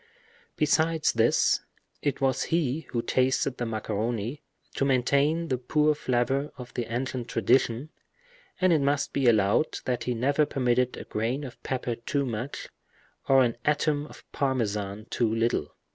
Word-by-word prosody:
Besides 160 +1 +2
this, 115 0 +3 0.4
it 145 - -1
was 135 -1 +1
he 160 -2 -1
who 115 -1 -2
tasted 130 +1 +1
the 120 - -2
macaroni, 110 +4 -3 0.3
to - - -1
maintain 140 +5 +2
the 130 -2 0
pure 150 +4 +2
flavor 135 +1 0
of 125 -1 -9
the 115 -2 -4
ancient 125 0 -3
tradition; 120 +5 +1 0.7
and 185 -1 +4
it 155 - +3
must 140 0 0
be 135 -3 +1
allowed 105 +5 +3
that 125 -2 -1
he 125 - -1
never 140 +5 +2
permitted 125 -1 +1
a - - -6
grain 120 +7 -2
of 125 -3 -9
pepper 125 -2 -2
too 135 +5 -2
much, 120 +3 -4 0.6
or 135 -1 +6
an 115 -2 0
atom 150 0 +1
of - - -14
parmesan 110 -6 -1
too 115 -2 +1
little. 115 +1 0
130 Hz, 150 wpm, -27 LUFS, 115-145 Hz, 0.7 s, or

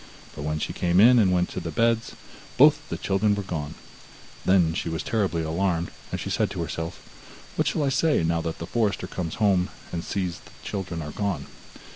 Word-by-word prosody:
But 75 - -6
when 75 +1 -1
she - - -3
came 90 +1 +2
in, 120 +4 +8
and 95 -4 +4
went 90 -1 +2
to - - -4
the 85 - -5
beds, 115 +6 +1 0.4
both - - +5
the - - -3
children 100 +2 +1
were 100 - -3
gone. 80 -6 -4 0.7
Then 90 -4 +4
she 85 - -2
was 80 0 -3
terribly 95 -7 0
alarmed, 85 +1 0 0.2
and - - -3
she - - -4
said - - +1
to 85 - -3
herself: 80 +1 -5 0.6
'What - - +1
shall 155 - +1
I 140 - +2
say 140 - +2
now 85 0 +1
when 80 0 -3
the 85 - -5
forester 105 -2 0
comes 90 -3 -4
home 95 -4 +2 0.2
and 85 -1 -3
sees 90 -3 -2
that - - -20
the - - -13
children 90 -5 -4
are 75 - -6
gone? 95 -8 -2
90 Hz, 210 wpm, -25 LUFS, 80-100 Hz, 0.7 s, in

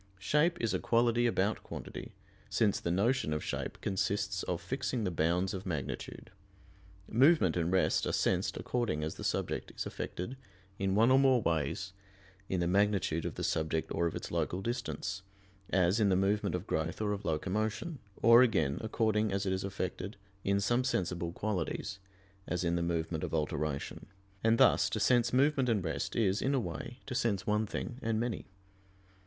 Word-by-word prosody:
Shape 150 - +2
is 115 -4 0
a 95 - +1
quality 120 0 +3
about 105 -2 0
quantity, - - -8 0.3
since 105 -3 +2
the - - -3
notion 100 - +1
of 75 - -2
shape - - -4
consists 100 0 -1
of 90 -2 -2
fixing 125 +5 -2
the 95 - 0
bounds 85 +3 +1
of 95 -1 -4
magnitude. 75 -7 -5 0.8
Movement 130 - +4
and 85 0 0
rest 95 - +2
are - - 0
sensed - - +1
according 115 -12 -1
as 80 - -2
the - - -9
subject - - -2
is - - -2
affected 120 +9 -5 0.4
in 95 0 +1
one 115 +4 +5
or 130 - +6
more 135 -2 +5
ways 85 +1 -1 0.6
in 95 -2 0
the 85 - +1
magnitude 95 -4 +2
of - - -6
the - - -4
subject 80 0 -1
or 85 - +1
of 85 - -4
its - - -6
local 95 +2 -1
distance, 120 -5 -3 0.5
as 90 +3 +3
in 105 -2 +4
the 95 - +3
movement 100 +1 +1
of 90 +2 -4
growth 80 -2 -2
or 105 -1 0
of 100 0 -5
locomotion, 105 - -2 0.2
or 115 +2 +8
again, 80 - +2
according 110 -1 +1
as 100 +1 -1
it 95 - +1
is 95 - -2
affected 95 +1 -4 0.3
in 100 0 +2
some 120 +5 +2
sensible 90 -8 -1
qualities, 95 0 -3 0.5
as 90 0 -1
in 85 0 +1
the 85 - 0
movement 85 -1 -1
of - - -2
alteration; 75 -2 -2 0.4
and 115 +1 +4
thus - - +5
to - - -2
sense 120 -2 +3
movement 135 0 +3
and 105 -5 +1
rest 80 -3 -3
is, 100 -3 +2
in 140 +2 +1
a - - +3
way, 90 +4 -5
to 130 - -5
sense 100 -6 0
one 105 +1 +1
thing 125 +4 -5
and 110 -1 0
many. 115 -4 -3
100 Hz, 180 wpm, -32 LUFS, 85-115 Hz, 0.8 s, or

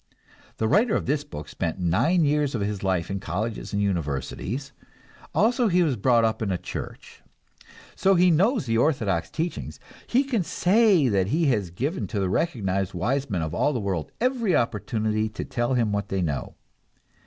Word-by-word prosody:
The 110 - 0
writer 215 - +3
of - - -1
this 145 +2 0
book 75 - -8
spent 85 +1 -3
nine 150 - +2
years 145 -2 +1
of 110 - -2
his 100 -1 -2
life 95 -2 -1
in 100 - -2
colleges 105 +4 -4
and 100 - -1
universities; 100 - -2 0.6
also 240 +3 +2
he 180 -2 +3
was 150 -6 +1
brought 115 +1 +3
up 110 0 -1
in 110 - -1
a 90 - 0
church. - - -8 0.7
So 195 0 +3
he 180 0 +5
knows 200 - +2
the 115 -1 +1
orthodox 110 - +1
teachings, 165 +2 -4 0.3
he 255 +3 +3
can 255 -7 0
say 190 - +3
that 100 -5 +1
he 160 +9 +1
has 105 -7 -1
given 140 - -3
to 105 - -3
the 95 -2 0
recognized 95 - -1
wise 135 +3 -1
men 90 -6 -1
of 80 - -3
the 125 - +1
world 95 -6 -3
every 240 -6 +1
opportunity 110 -1 0
to 110 - -6
tell 120 +2 -1
him 115 -4 +1
what 100 -1 -2
they 95 -1 -1
know. 75 -5 -3
115 Hz, 180 wpm, -25 LUFS, 95-165 Hz, 0.7 s, he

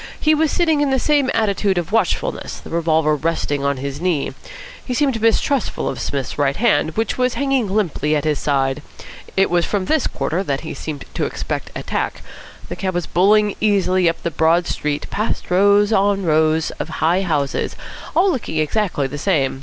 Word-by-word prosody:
He 310 - +3
was 310 0 +2
sitting 320 -4 +2
in 290 - +2
the 265 - +2
same 285 0 +2
attitude 200 -3 +1
of 175 +2 -2
watchfulness, 220 -6 -1
the - - -12
revolver 160 -2 +2
resting 145 -2 -1
on 140 -1 0
his 140 +2 -5
knee. 175 -6 0 0.5
He 250 - -3
seemed 265 -5 +1
mistrustful 230 +4 +1
of - - -3
Psmith's 140 0 -3
right 140 -1 +2
hand, 210 -8 +1
which 225 +3 -1
was 250 0 +1
hanging 270 -5 +1
limply 180 -6 0
at 150 - 0
his 150 -2 0
side. 135 0 0 0.6
It 195 -1 +3
was 175 -1 +3
from 195 0 -1
this 310 +4 +1
quarter 175 +4 -2
that 140 -7 -2
he 160 - -6
seemed 150 -3 -6
to - - -1
expect - - -4
attack. - - -3 0.4
The - - -5
cab 185 -2 -3
was 175 - -1
bowling 205 +3 +3
easily 185 -4 +3
up 165 - -5
the 170 - -1
broad 165 +2 +2
street, 150 -3 -2
past 215 -3 -2
rows 205 +3 +4
on 200 0 +2
rows 155 0 +2
of - - -4 0.2
high 175 +4 +3
houses, 150 -7 -1 0.4
all 370 +4 +4
looking 225 - -3
exactly 155 -1 0
the 140 +2 -5
same. 140 -7 0
180 Hz, 185 wpm, -20 LUFS, 155-220 Hz, 0.6 s, rows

